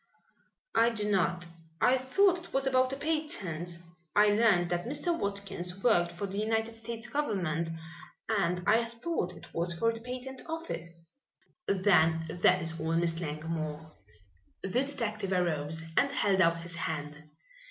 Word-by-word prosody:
"I 230 Hz, +1 st, +5 dB
do 210 Hz, -3 st, -1 dB
not. 180 Hz, -2 st, +1 dB, 0.3 s
I 255 Hz, -, +5 dB
thought 365 Hz, +8 st, +3 dB
it -, -, -16 dB
was 270 Hz, 0 st, +2 dB
about 255 Hz, -1 st, +3 dB
a -, -, -2 dB
patent. 210 Hz, -, -2 dB, 0.4 s
I 210 Hz, 0 st, +6 dB
learned 205 Hz, -5 st, +3 dB
that 175 Hz, +4 st, -1 dB
Mr. 315 Hz, +6 st, 0 dB
Watkins 195 Hz, -, -4 dB
worked 175 Hz, -8 st, +4 dB
for 175 Hz, +4 st, -4 dB
the 200 Hz, +1 st, -4 dB
United 225 Hz, +1 st, 0 dB
States 230 Hz, +1 st, -4 dB
government 180 Hz, -, -1 dB, 0.6 s
and 180 Hz, -5 st, 0 dB
I 225 Hz, +2 st, +4 dB
thought 230 Hz, -, -3 dB
it -, -, -14 dB
was 170 Hz, +1 st, -1 dB
for 230 Hz, +6 st, +1 dB
the 225 Hz, -, -8 dB
patent 255 Hz, +2 st, -6 dB
office." 170 Hz, -, -6 dB, 0.5 s
"Then 165 Hz, -5 st, +3 dB
that 180 Hz, +2 st, +3 dB
is 165 Hz, 0 st, 0 dB
all, 160 Hz, +1 st, -1 dB
Miss 165 Hz, -1 st, +1 dB
Langmore." 155 Hz, -1 st, -4 dB, 0.7 s
The 195 Hz, -, -3 dB, 0.2 s
detective 220 Hz, -8 st, -3 dB
arose 160 Hz, -3 st, +1 dB
and 280 Hz, -, +4 dB
held 205 Hz, -8 st, +2 dB
out 170 Hz, -1 st, +4 dB
his 170 Hz, +1 st, -6 dB
hand. 150 Hz, -2 st, -4 dB
195 Hz, 150 wpm, -30 LUFS, 170-235 Hz, 0.7 s, I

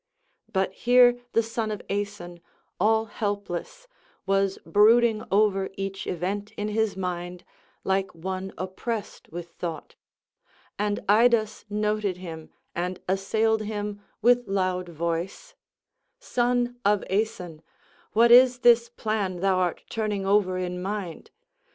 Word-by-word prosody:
But 190 Hz, -1 st, 0 dB
here 245 Hz, +2 st, +5 dB
the 230 Hz, -, +3 dB
son 225 Hz, 0 st, -3 dB
of 210 Hz, -1 st, -5 dB
Aeson, 200 Hz, -4 st, -4 dB, 0.4 s
all 220 Hz, +3 st, +3 dB
helpless, 205 Hz, -, -4 dB, 0.4 s
was 195 Hz, 0 st, +1 dB
brooding 220 Hz, +1 st, +4 dB
over 195 Hz, -1 st, +2 dB
each 195 Hz, 0 st, -4 dB
event 195 Hz, +4 st, -3 dB
in 210 Hz, 0 st, -3 dB
his 220 Hz, -2 st, 0 dB
mind, 180 Hz, -1 st, -4 dB, 0.4 s
like 190 Hz, -1 st, 0 dB
one 185 Hz, +3 st, -4 dB
oppressed 195 Hz, +4 st, -5 dB
with 170 Hz, 0 st, -7 dB
thought. 165 Hz, -2 st, -6 dB, 0.9 s
And 205 Hz, 0 st, 0 dB
Idas 220 Hz, 0 st, +3 dB
noted 210 Hz, -2 st, -1 dB
him 165 Hz, -3 st, -8 dB, 0.2 s
and 180 Hz, +1 st, -3 dB
assailed 215 Hz, +4 st, +1 dB
him 205 Hz, -1 st, -4 dB, 0.2 s
with 245 Hz, +1 st, +4 dB
loud 185 Hz, -2 st, -1 dB
voice: 170 Hz, -, -4 dB, 0.6 s
"Son 245 Hz, -, 0 dB
of 205 Hz, -1 st, +2 dB
Aeson, 185 Hz, -6 st, -2 dB, 0.5 s
what 235 Hz, +2 st, +5 dB
is 250 Hz, 0 st, +7 dB
this 235 Hz, -1 st, +5 dB
plan 210 Hz, -4 st, -2 dB
thou 190 Hz, 0 st, +2 dB
art 180 Hz, -2 st, -1 dB
turning 210 Hz, -3 st, -2 dB
over 195 Hz, -2 st, +2 dB
in 180 Hz, 0 st, -3 dB
mind. 195 Hz, -3 st, -5 dB
205 Hz, 120 wpm, -26 LUFS, 185-220 Hz, 0.9 s, is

